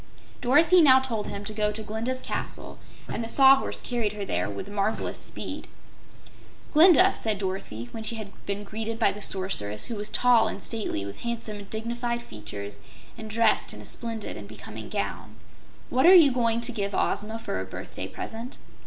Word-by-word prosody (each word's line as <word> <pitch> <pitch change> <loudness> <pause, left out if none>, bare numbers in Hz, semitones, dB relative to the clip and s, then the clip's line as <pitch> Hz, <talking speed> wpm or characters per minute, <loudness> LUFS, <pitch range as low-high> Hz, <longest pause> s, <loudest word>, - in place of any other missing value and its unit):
Dorothy 320 +8 +5
now 265 -4 +8
told 235 -5 -3
him 200 - -5
to 215 - -3
go 210 0 +1
to 215 +1 -4
Glinda's 230 +5 -3
Castle - - -5 0.3
and 230 - -3
the 225 - -5
Sawhorse 270 +2 +5
carried 235 -4 -1
her 205 -1 -4
there - - -1
with 190 - -6
marvelous 205 +1 -2
speed. - - -3 1.1
"Glinda," 360 +4 +7
said 220 -2 -1
Dorothy, 185 - -4
when 225 - -6
she 220 +1 -4
had 215 -3 -7 0.2
been 200 +1 -3
greeted 220 +2 -4
by 225 -3 +3
the 205 +1 -9
Sorceress, 145 - -2
who 235 - -5
was 210 0 -1
tall 245 -2 +4
and 200 - -4
stately, 215 - -3
with 100 0 -8
handsome 230 -3 -4
and 200 -1 -11
dignified 235 +2 -3
features 100 - -8 0.4
and 220 -1 -8
dressed 225 +1 +2
in - - -10
a - - -11
splendid 225 -3 -5
and - - -9
becoming - - -9
gown, - - -4 0.6
"what 260 +6 +4
are 375 - +10
you 315 -6 +8
going 235 -2 +1
to 235 - 0
give 200 -4 -2
Ozma 220 +2 0
for 225 - -4
a - - -5
birthday 95 - -7
present?" 230 +3 -7
220 Hz, 185 wpm, -26 LUFS, 200-240 Hz, 1.1 s, are